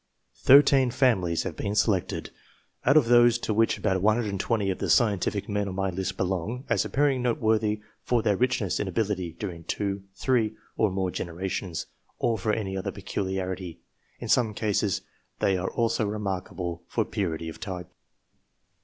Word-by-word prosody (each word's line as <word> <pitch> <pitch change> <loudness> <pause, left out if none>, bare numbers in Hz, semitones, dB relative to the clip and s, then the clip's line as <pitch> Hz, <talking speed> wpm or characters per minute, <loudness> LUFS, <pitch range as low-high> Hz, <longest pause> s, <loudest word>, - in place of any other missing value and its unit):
Thirteen 135 -1 +6
families 110 -10 +2
have - - -4
been 100 +1 -3
selected, 100 -4 0 0.5
out 135 +4 +6
of 150 - +5
those 120 0 +6
to 110 - -2
which 115 +2 +2
about 95 -3 0
120 105 -1 +1
of 95 - -4
the - - -2
scientific 105 -4 +2
men 105 -1 -1
on 95 - -5
my 95 0 0
list 95 +1 -3
belong, 95 - -2
as - - +2
appearing 140 -2 +1
noteworthy 110 -3 +1 0.2
fortheir 115 -4 +2
richness 125 -7 +1
in - - -1
ability 95 -3 -1
during 85 -2 -6
two, 100 +3 -2
three, 110 -1 +1 0.2
or 110 - +2
more 95 -1 -1
generations, 90 0 -4 0.3
or 115 -1 +1
for 110 - 0
any 100 -3 -2
other 95 - -3
peculiarity; 95 -2 -4 0.4
in - - -6
some 110 -4 +2
cases 105 -2 0 0.4
they 95 - +2
are 95 +1 -1
also 115 -2 0
remarkable 95 -4 -4
for 110 +4 0
purity 85 -6 -3
of 80 - -8
type. 90 -4 -6
100 Hz, 155 wpm, -27 LUFS, 95-115 Hz, 0.5 s, Thirteen